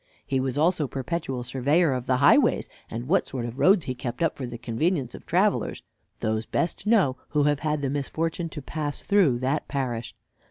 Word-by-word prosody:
He 135 - 0
was 130 0 -2
also 160 -1 +2
perpetual 135 -1 -3
surveyor 140 +5 +2
of 125 -1 -4
the 130 - +3
highways, 140 - +4 0.2
and 120 +3 -5
what 190 +4 +2
sort 125 -3 -4
of 120 +3 -6
roads 185 -4 +5
he 130 - -2
kept 120 +3 -4
up 165 - +1
for 130 - -5
the 120 0 -7
convenience 125 +3 -1
of - - -11
travelers, - - +1 0.4
those 110 +1 -1
best 170 +4 -1
knew 200 - +4
who 150 -1 +2
have 145 -1 +2
had 150 -1 -1
the 135 - 0
misfortune 165 +4 -2
to 150 -3 -8
pass 150 0 -4
through 185 -12 +3
that 130 +4 -1
parish. 125 -5 -3
140 Hz, 195 wpm, -26 LUFS, 125-160 Hz, 0.4 s, roads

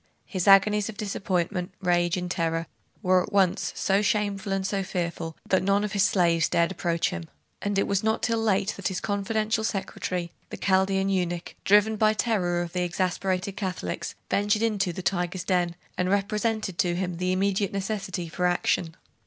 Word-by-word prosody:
His 185 -2 -3
agonies 205 +1 +5
of 215 - -8
disappointment, 185 -2 -2
rage, 175 -1 +2
and 180 0 -3
terror 165 -1 -1 0.4
were 185 0 +4
at - - -6
once 190 -3 +2
so 195 +1 +2
shameful 205 -1 0
and 195 0 0
so 195 0 0
fearful, 170 -3 -3
that 190 - +3
none 200 +2 +2
of 210 - -2
his 200 -1 +1
slaves 170 -4 +3
dare 170 - +3
approach 170 -2 0
him; 85 -1 -5 0.4
and 205 -1 -1
it 195 - +3
was 200 0 0
not 220 0 0
till 230 -1 +1
late 205 -2 +1
that 200 - -2
his 190 -2 -2
confidential 215 +2 -1
secretary, 185 -4 -3 0.2
the - - -6
Chaldean 195 0 +2
eunuch, 175 -2 -1
driven 210 +2 +4
by 215 0 +4
terror 185 -5 0
of 170 - -8
the 180 - 0
exasperated 185 +2 -1
Catholics, 185 - -4
ventured 205 +2 +1
into 205 -5 +1
the 180 +2 -6
tiger's 180 -1 -1
den, 180 -3 +1 0.2
and 180 0 +1
represented 210 0 0
to 175 -1 +2
him 180 -1 -2
the 180 +1 0
immediate 195 +1 +1
necessity 195 -3 -3
for 180 +2 0
action. 175 -1 0
190 Hz, 180 wpm, -26 LUFS, 175-205 Hz, 0.4 s, agonies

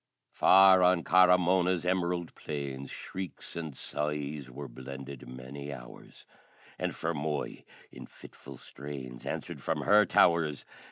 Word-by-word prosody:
Far 95 -1 +6
on 90 -1 +4
Carah 90 +1 +6
Mona's 90 0 +1
emerald 90 -2 -1
plains 70 -2 -6
Shrieks 95 -1 -7
and 80 -5 -6
sighs 75 -2 -3
were 70 +3 -8
blended 65 +2 -9
many 65 +3 -8
hours. - - -12 0.5
And - - -1
Fermoy 75 -2 -3 0.3
in - - -11
fitful 70 -1 -13
strains 65 -3 -9
Answered - - -5
from - - -1
her 105 +1 +5
towers. 80 -5 +3
75 Hz, 120 wpm, -30 LUFS, 70-90 Hz, 0.5 s, Far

